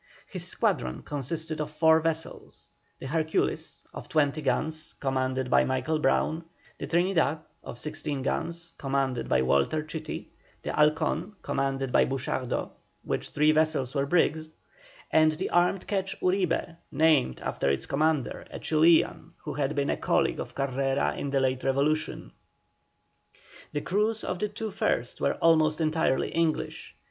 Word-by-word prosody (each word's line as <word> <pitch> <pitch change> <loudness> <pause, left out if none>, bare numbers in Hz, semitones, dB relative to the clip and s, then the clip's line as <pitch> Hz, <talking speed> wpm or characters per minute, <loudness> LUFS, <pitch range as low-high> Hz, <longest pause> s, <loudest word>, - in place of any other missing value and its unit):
His - - -6
squadron 65 0 -1
consisted 155 +3 -3
of 150 - -3
four 160 +1 +4
vessels 160 0 -4 0.3
the - - -9
Hercules 160 +3 -1
of - - -8
20 150 0 +1
guns, 155 +1 -1
commanded 130 -1 -1
by - - +6
Michael 130 +4 0
Brown; 160 +1 +1 0.4
the - - -4
Trinidad 165 -4 +1 0.2
of - - -8
16 145 0 -3
guns, 170 +4 -3
commanded 135 -3 -1
by 65 - +3
Walter 70 - +2
Chitty; 155 +1 -6 0.3
the - - -2
Halcon, 155 +5 +1
commanded 135 -1 -1
by - - +5
Buchardo, 130 -1 -2 0.3
which - - -3
three 150 +1 +3
vessels 155 -4 +1
were 140 -1 0
brigs; 160 -1 +2 0.6
and 155 0 +5
the 170 +5 -3
armed 175 +2 +2
quetch 195 -2 -2
Uribe, 180 -3 0
named 155 - +3
after - - -1
its 70 -1 0
commander, 150 -2 0
a - - -7
Chilian, 165 +1 +3
who - - -4
had 140 +1 -1
been 140 -1 +1
a - - -1
colleague - - +1
of - - -6
Carrera 135 0 0
in 140 - -3
the 135 0 +1
late 130 -1 0
revolution. 145 +4 0 1.4
The 145 - -2
crews 210 +6 0
of 180 -1 -3
the 210 - -1
two 215 +1 -5
first 120 -9 -1
were - - +2
almost 155 -1 +3
entirely 155 -4 +1
English. 165 -2 -1
155 Hz, 145 wpm, -28 LUFS, 135-160 Hz, 1.4 s, by